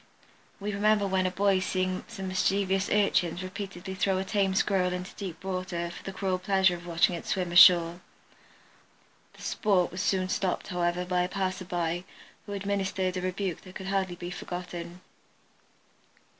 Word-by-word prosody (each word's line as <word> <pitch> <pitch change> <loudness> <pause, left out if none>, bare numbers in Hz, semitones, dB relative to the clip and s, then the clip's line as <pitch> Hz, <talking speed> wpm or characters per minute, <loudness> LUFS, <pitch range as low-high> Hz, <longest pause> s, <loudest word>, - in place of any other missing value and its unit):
We 205 +1 -3
remember 210 0 +3
when 190 -1 +1
a - - +1
boy 195 +1 +2
seeing 185 0 -1
some 190 -1 -6
mischievous 195 +1 +1
urchins 185 -4 +2
repeatedly 190 0 -6
throw 190 0 +1
a 190 - 0
tame 195 -1 +1
Squirrel 185 -2 +2
into 180 +1 -5
deep 190 -2 -7
water 185 -2 -3
for - - -10
the 195 - -6
cruel 190 -1 -1
pleasure 190 -1 +3
of 175 0 -8
watching 170 +1 +3
it 170 - -6
swim 180 -2 -1
ashore. 175 -1 +7 1.3
The - - -14
"sport" 195 -5 +1
was 180 - -4
soon 185 -1 +1
stopped, 185 0 -1
however, 175 0 0
by 180 0 +1
a 180 - -1
passerby, 180 -3 -2 0.4
who 205 - -5
administered 195 -2 -1
a 185 - -2
rebuke 185 -1 -2
that 185 -1 -13
could 190 0 -5
hardly 190 -2 0
be 175 0 -6
forgotten. 175 -1 -6
185 Hz, 160 wpm, -28 LUFS, 180-195 Hz, 1.3 s, ashore